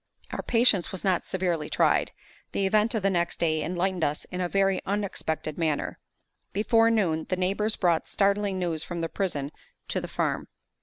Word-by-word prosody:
Our - - -3
patience 230 -6 +3
was 190 - -6
not 185 -3 +1
severely 175 -5 -1
tried. - - +2 0.4
The 195 - +1
event 215 +4 +2
of 215 - -1
the 195 - +3
next 175 -1 0
day 155 -2 +1
enlightened 180 +1 -1
us 150 0 0
in 180 0 -3
a 175 - -1
very 195 0 +2
unexpected 185 -6 -2
manner. 155 -3 -1 0.5
Before 225 +3 +4
noon, 175 -8 +1
the 185 - +1
neighbors 200 +4 0
brought 170 -3 +1
startling 200 -1 +1
news 170 -4 -1
from 170 -1 -5
the 165 - -2
prison 150 -8 -2 0.4
to - - -1
the - - -5
farm. - - -1
185 Hz, 175 wpm, -27 LUFS, 170-200 Hz, 0.5 s, Before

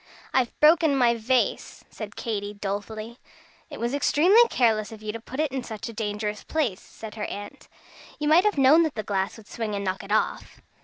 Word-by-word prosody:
"I've 255 -3 0
broken 310 -1 +5
my 240 -2 +4
vase," 240 +2 -1
said - - -8
Katy, 205 -3 -4
dolefully. 215 +3 -5 0.5
"It - - -9
was 235 +2 -2
extremely 325 +9 +5
careless 220 -4 +1
of 215 -1 -11
you 215 - -3
to 230 - -7
put 255 +4 -8
it 310 -3 +1
in 265 -1 -3
such 220 0 -6
a - - -8
dangerous 210 -1 -3
place," 270 -12 -1
said 220 -1 -10
her 215 -1 -4
aunt. 205 0 -8 0.5
"You 300 - -2
might 330 +6 +5
have 420 - +2
known 275 +5 +6
that 315 -3 0
the 215 - -3
glass 195 0 -2
would 220 - -14
swing 220 -3 -4
and 200 0 -3
knock 185 0 -2
it 200 - -9
off." 215 - -1
225 Hz, 205 wpm, -25 LUFS, 210-270 Hz, 0.5 s, known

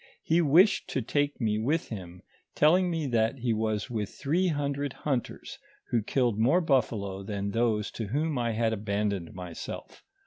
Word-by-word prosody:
He 165 +2 +3
wished 170 +7 +4
to 130 - -1
take 145 +4 0
me 110 -3 0
with 150 +9 0
him, 90 -5 -8 0.3
telling 180 +5 +4
me 165 -3 -1
that 115 0 +1
he 120 -2 0
was 110 -1 -1
with 105 -4 -2
three 170 +7 0
hundred 145 -3 -2
hiinters, 135 -5 -3 0.3
who 120 - +2
killed 120 -1 0
more 135 +11 +4
buffalo 110 - 0
than 100 0 -3
those 110 -2 0
to 110 - -5
whom 150 +7 -1
I 120 -1 0
had 110 0 +1
abandoned 100 -4 -2
myself. 90 -2 -8
115 Hz, 165 wpm, -28 LUFS, 105-145 Hz, 0.3 s, wished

